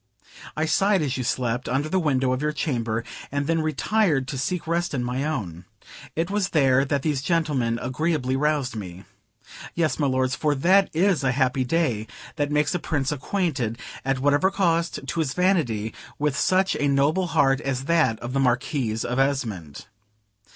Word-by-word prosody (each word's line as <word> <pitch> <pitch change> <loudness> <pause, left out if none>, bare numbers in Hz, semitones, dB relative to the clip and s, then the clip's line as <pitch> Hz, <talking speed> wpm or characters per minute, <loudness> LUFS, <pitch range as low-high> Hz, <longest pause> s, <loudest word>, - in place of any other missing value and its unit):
I 155 - +1
sighed 195 +3 +2
as 140 -2 -1
you 130 - -2
slept, 125 0 -1
under 135 +4 0
the 190 +4 +1
window 135 -5 +1
of 130 - -2
your 150 0 0
chamber, 115 -7 -1 0.3
and 145 0 -1
then 165 +1 +1
retired 155 -2 +1
to 135 - -4
seek 180 +5 -2
rest 170 -1 -1
in 125 - -1
my 125 +2 -2
own. 95 - -4 0.5
It 165 +4 -1
was 205 -2 0
there 135 -4 +3
that 140 0 -1
these 150 -4 0
gentlemen 140 -7 0
agreeably 130 +1 -1
roused 145 -3 0
me. 95 -3 -7 0.7
Yes, 165 -2 +1
milords, 130 -3 +1
for 150 +1 0
that 190 +7 +4
is 180 -3 +2
a 130 -1 +2
happy 130 0 +1
day 125 -7 0 0.3
that 145 -1 0
makes 150 0 +1
a 180 - 0
Prince 145 -4 -1
acquainted, 140 - -1 0.3
at 135 0 0
whatever 145 +7 +3
cost 170 -6 0
to 150 +5 -3
his 140 -5 -1
vanity, 140 - +1 0.2
with 150 -1 0
such 190 +5 +2
a 145 - +1
noble 145 +7 +2
heart 140 -4 +2
as 135 -2 -2
that 160 -9 +2
of 120 +1 -5
the 135 - +1
Marquis 125 -1 0
of 125 +2 -1
Esmond. 110 - -2
140 Hz, 175 wpm, -24 LUFS, 130-160 Hz, 0.7 s, that